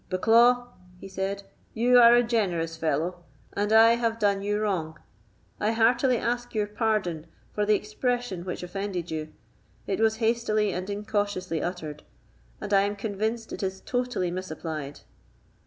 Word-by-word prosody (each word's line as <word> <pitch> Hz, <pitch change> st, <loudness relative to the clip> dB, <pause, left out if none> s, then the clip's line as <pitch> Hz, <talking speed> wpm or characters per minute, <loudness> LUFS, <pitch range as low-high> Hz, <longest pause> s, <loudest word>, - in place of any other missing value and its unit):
"Bucklaw," 240 Hz, +6 st, +4 dB, 0.3 s
he -, -, -9 dB
said, 195 Hz, +1 st, -3 dB, 0.3 s
"you 245 Hz, +2 st, +5 dB
are 235 Hz, 0 st, +8 dB
a 240 Hz, -, +5 dB
generous 180 Hz, -9 st, -1 dB
fellow, 165 Hz, +3 st, -2 dB, 0.3 s
and 205 Hz, +1 st, -1 dB
I 225 Hz, +1 st, +7 dB
have 230 Hz, -1 st, -1 dB
done 200 Hz, -2 st, +1 dB
you 205 Hz, +1 st, -1 dB
wrong. 170 Hz, -7 st, -2 dB, 0.6 s
I 215 Hz, +2 st, +1 dB
heartily 240 Hz, +3 st, +3 dB
ask 240 Hz, +1 st, -3 dB
your 210 Hz, -1 st, +1 dB
pardon 205 Hz, -7 st, -1 dB, 0.3 s
for 210 Hz, 0 st, -1 dB
the 210 Hz, -, +5 dB
expression 215 Hz, -2 st, -2 dB
which 180 Hz, 0 st, -5 dB
offended 180 Hz, -2 st, -4 dB
you; 155 Hz, -1 st, -4 dB, 0.5 s
it 195 Hz, -, -2 dB
was 220 Hz, 0 st, +3 dB
hastily 220 Hz, -3 st, +1 dB
and 185 Hz, +2 st, -4 dB
incautiously 205 Hz, -5 st, -2 dB
uttered, 160 Hz, -4 st, -5 dB, 0.6 s
and 205 Hz, -, -4 dB
I 195 Hz, -, +6 dB
am 205 Hz, +1 st, -1 dB
convinced 220 Hz, +2 st, -3 dB
it -, -, -6 dB
is 190 Hz, -1 st, -3 dB
totally 245 Hz, -8 st, -2 dB
misapplied." 155 Hz, -5 st, -6 dB
205 Hz, 150 wpm, -26 LUFS, 180-225 Hz, 0.6 s, are